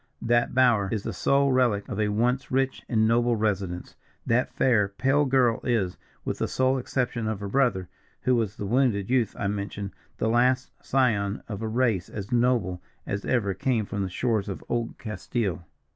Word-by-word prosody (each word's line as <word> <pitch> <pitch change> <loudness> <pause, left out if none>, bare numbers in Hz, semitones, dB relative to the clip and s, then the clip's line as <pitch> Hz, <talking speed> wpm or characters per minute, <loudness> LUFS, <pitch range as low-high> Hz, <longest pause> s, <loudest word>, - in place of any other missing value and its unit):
That 120 +1 +2
bower 120 -6 +4
is 110 -3 -2
the 115 - -4
sole 140 +8 +2
relic 120 -6 +2
of - - -4
a 105 - +2
once 120 +5 0
rich 135 0 0
and 110 -2 +3
noble 120 +1 +3
residence 100 -5 -2 0.3
that 120 +2 +1
fair, 115 -6 +3
pale 135 +8 +1
girl 125 -4 +3
is, 105 -8 0 0.3
with - - -3
the - - 0
sole 130 +1 +1
exception 125 -3 -2
of 110 -2 -2
her 100 - -4
brother, 100 -6 +1 0.3
who 130 - +2
was 110 -4 -1
the 100 - -5
wounded 115 -2 +1
youth 120 -5 +1
I 105 - -3
mentioned, 100 0 -3 0.3
the - - 0
last 125 +3 +2
scion 110 -6 +1
of 105 -2 -5
a 110 - -2
race 110 -5 0
as 100 -2 -7
noble 120 -7 +1 0.2
as 100 +1 -3
ever 105 -6 +1
came 115 0 0
from 100 0 -4
the 95 - -2
shores 110 +1 -1
of 95 - -6
old 120 -1 -2
Castile." 100 -4 -3
115 Hz, 185 wpm, -26 LUFS, 100-125 Hz, 0.3 s, bower